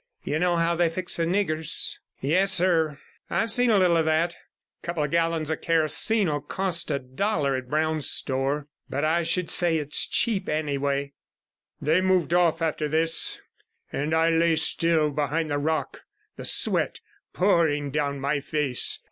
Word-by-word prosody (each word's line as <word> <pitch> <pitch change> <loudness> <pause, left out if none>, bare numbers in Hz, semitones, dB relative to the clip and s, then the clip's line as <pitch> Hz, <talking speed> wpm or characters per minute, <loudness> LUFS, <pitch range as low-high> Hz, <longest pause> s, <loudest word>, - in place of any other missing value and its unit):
You 150 +2 -2
know 175 0 +2
how 170 0 +1
they 170 0 +2
fix 180 +2 -2
the 165 - 0
niggers?' 165 -4 +1 0.2
'Yes, 180 +8 +2
sir, 165 -5 +1 0.3
I've 225 -1 0
seen 245 +2 +3
a 215 - +4
little 180 -3 +3
of 160 - +1
that. 160 +2 +1
A - - -19 0.5
couple 170 -3 -2
of 150 - -3
gallons 165 -2 0
of 160 - -3
kerosene 165 +6 +2
'11 145 -1 -3
cost 185 -4 -1
a 140 - 0
dollar 140 +2 -1
at 130 -1 -6
Brown's 155 0 +1
store, 135 +2 0 0.2
but 145 +3 -1
I 165 +2 +2
should 170 +1 -1
say 170 -2 +2
it's 150 -1 -1
cheap 205 -5 0
anyway.' 140 -2 -2 0.7
They 160 +5 +2
moved 185 -3 +1
off 170 -2 +2
after 155 -1 -1
this, 160 +2 -1 0.5
and 150 +3 -1
I 165 +1 +3
lay 165 0 +3
still 160 -1 +1
behind 150 +2 -1
the 145 - 0
rock, 155 +2 -2 0.3
the - - -8
sweat - - +1 0.3
pouring 160 -7 +1
down 140 -1 -1
my 140 +1 -1
face. 145 -3 -1
160 Hz, 165 wpm, -25 LUFS, 145-170 Hz, 0.7 s, a